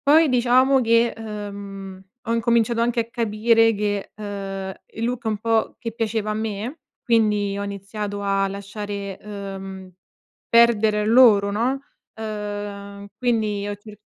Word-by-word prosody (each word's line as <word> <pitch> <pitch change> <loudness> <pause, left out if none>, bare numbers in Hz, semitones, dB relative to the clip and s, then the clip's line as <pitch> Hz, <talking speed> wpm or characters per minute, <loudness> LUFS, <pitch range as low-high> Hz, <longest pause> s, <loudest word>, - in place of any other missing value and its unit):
Poi 310 +1 +6
diciamo 255 +2 +4
che, 230 0 +3
ehm, 200 -3 -7 0.2
ho 230 - -1
incominciato 230 0 +2
anche 235 0 +2
a 230 - -7
capire 225 0 +3
che, 205 -1 -2
ehm, 195 -2 -5 0.2
il 225 - -4
look 245 0 -3
un 215 -1 0
po' 225 +1 0
che 230 - -5
piaceva 220 -1 -2
a - - 0
me, 220 +6 -4 0.2
quindi 210 -4 +2
ho 200 - -3
iniziato 200 +1 -5
a 195 0 +1
lasciare, 200 0 -6
ehm, 195 -2 -7 0.6
perdere 220 -3 +4
loro, 215 -3 +6
no, 250 +6 0 0.3
ehm, 205 -2 -6
quindi 215 -5 0
ho 205 - -3
cerc 210 +1 -13
210 Hz, 135 wpm, -23 LUFS, 200-230 Hz, 0.6 s, Poi